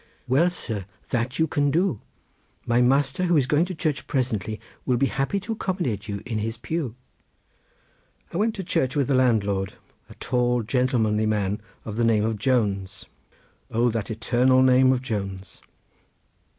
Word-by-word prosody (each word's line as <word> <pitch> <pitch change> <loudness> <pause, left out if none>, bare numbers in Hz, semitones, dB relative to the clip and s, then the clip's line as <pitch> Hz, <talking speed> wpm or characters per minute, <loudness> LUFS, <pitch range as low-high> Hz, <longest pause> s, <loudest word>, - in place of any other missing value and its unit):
"Well, 145 +8 +4
sir! 110 - -5 0.3
that 125 +1 -1
you 160 - +3
can 145 -2 +1
do. 165 - +1 0.6
My 120 +1 +3
master, 135 +6 +2
who 175 -2 +3
is 140 - +3
going 150 +5 +2
to 185 0 -6
church 155 -3 -2
presently, 110 -6 -1 0.2
will 125 -2 +1
be 135 - +3
happy 135 +9 -1
to 215 - -5
accommodate 175 - -2
you 100 -1 -5
in 115 -3 -2
his 110 +2 -3
pew." 140 -2 -3 1.4
I - - -2
went 215 +2 +1
to 195 - -4
the - - -16
church 130 +1 0
with 140 -3 +1
the - - +3
landlord, 105 -7 +2 0.4
a - - -12
tall 125 -1 0
gentlemanly 110 -3 +1
man 105 -1 0 0.2
of 110 -1 -5
the 120 - +2
name 110 -2 +3
of 110 -2 -2
Jones—O 110 +1 -2
that 110 0 -3
eternal 125 +3 +3
name 130 0 +5
of 130 -1 0
Jones! 95 -5 -5
125 Hz, 165 wpm, -24 LUFS, 110-140 Hz, 1.4 s, name